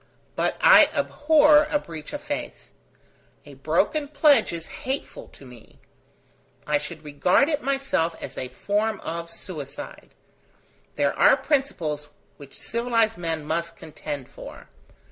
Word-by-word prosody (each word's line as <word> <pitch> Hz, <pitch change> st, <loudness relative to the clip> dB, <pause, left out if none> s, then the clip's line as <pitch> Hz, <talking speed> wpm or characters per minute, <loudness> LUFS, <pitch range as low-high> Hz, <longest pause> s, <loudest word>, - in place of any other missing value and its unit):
But -, -, -1 dB
I -, -, +8 dB
abhor 300 Hz, 0 st, +4 dB
a 295 Hz, -, +2 dB
breach 160 Hz, -, -9 dB
of 290 Hz, -, -6 dB
faith. 290 Hz, -, -6 dB, 0.7 s
A -, -, -12 dB
broken 305 Hz, -2 st, 0 dB
pledge 290 Hz, 0 st, +4 dB
is 165 Hz, -1 st, -6 dB, 0.2 s
hateful 265 Hz, +2 st, -5 dB
to 140 Hz, -, -16 dB
me. 125 Hz, -3 st, -15 dB, 0.9 s
I 150 Hz, -1 st, +1 dB
should 155 Hz, +1 st, -8 dB
regard 165 Hz, -, +2 dB
it 300 Hz, -2 st, -1 dB
myself 265 Hz, -12 st, -1 dB
as -, -, -8 dB
a 130 Hz, -, -4 dB
form 205 Hz, +10 st, -1 dB
of 170 Hz, +1 st, -5 dB
suicide. 170 Hz, -, -9 dB, 0.8 s
There -, -, +1 dB
are -, -, +5 dB
principles 160 Hz, -, -2 dB, 0.3 s
which 140 Hz, -2 st, -13 dB
civilized 230 Hz, -2 st, 0 dB
men 165 Hz, -3 st, -3 dB
must 170 Hz, +2 st, -3 dB
contend 145 Hz, -3 st, -7 dB
for. -, -, -12 dB
180 Hz, 130 wpm, -24 LUFS, -, 0.9 s, I